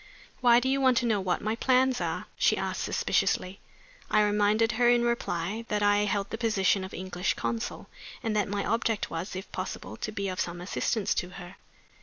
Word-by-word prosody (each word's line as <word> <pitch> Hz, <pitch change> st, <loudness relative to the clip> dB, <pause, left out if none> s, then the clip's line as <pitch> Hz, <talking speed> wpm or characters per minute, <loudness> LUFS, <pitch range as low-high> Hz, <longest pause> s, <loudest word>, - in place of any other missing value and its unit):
"Why 240 Hz, -1 st, +6 dB
do 255 Hz, -, -2 dB
you 270 Hz, +1 st, +1 dB
want 260 Hz, -2 st, +4 dB
to 240 Hz, -, +2 dB
know 215 Hz, -4 st, +1 dB
what 185 Hz, -2 st, -1 dB
my 215 Hz, +1 st, 0 dB
plans 255 Hz, +1 st, +2 dB
are?" -, -, -2 dB
she -, -, +3 dB
asked, -, -, -2 dB
suspiciously. 185 Hz, +2 st, 0 dB, 0.5 s
I 215 Hz, 0 st, +4 dB
reminded 210 Hz, +2 st, +2 dB
her 240 Hz, +1 st, +3 dB
in 240 Hz, 0 st, +4 dB
reply 220 Hz, -3 st, -1 dB
that 210 Hz, 0 st, 0 dB
I 205 Hz, 0 st, +4 dB
held 200 Hz, -1 st, -1 dB
the 225 Hz, -, -4 dB
position 205 Hz, -4 st, +2 dB
of 190 Hz, -, -7 dB
English 185 Hz, 0 st, -2 dB
consul, 230 Hz, -1 st, -3 dB, 0.4 s
and 225 Hz, -2 st, -1 dB
that 210 Hz, -2 st, +1 dB
my 200 Hz, 0 st, -2 dB
object 225 Hz, -1 st, 0 dB
was, 170 Hz, +4 st, -4 dB
if 190 Hz, +2 st, -7 dB
possible, -, -, -5 dB
to 215 Hz, -, -4 dB
be 200 Hz, -2 st, -3 dB
of 185 Hz, -1 st, -4 dB
some 175 Hz, 0 st, -2 dB
assistance 200 Hz, +3 st, -1 dB
to 180 Hz, -, -2 dB
her. 175 Hz, 0 st, -10 dB
210 Hz, 200 wpm, -28 LUFS, 190-235 Hz, 0.5 s, Why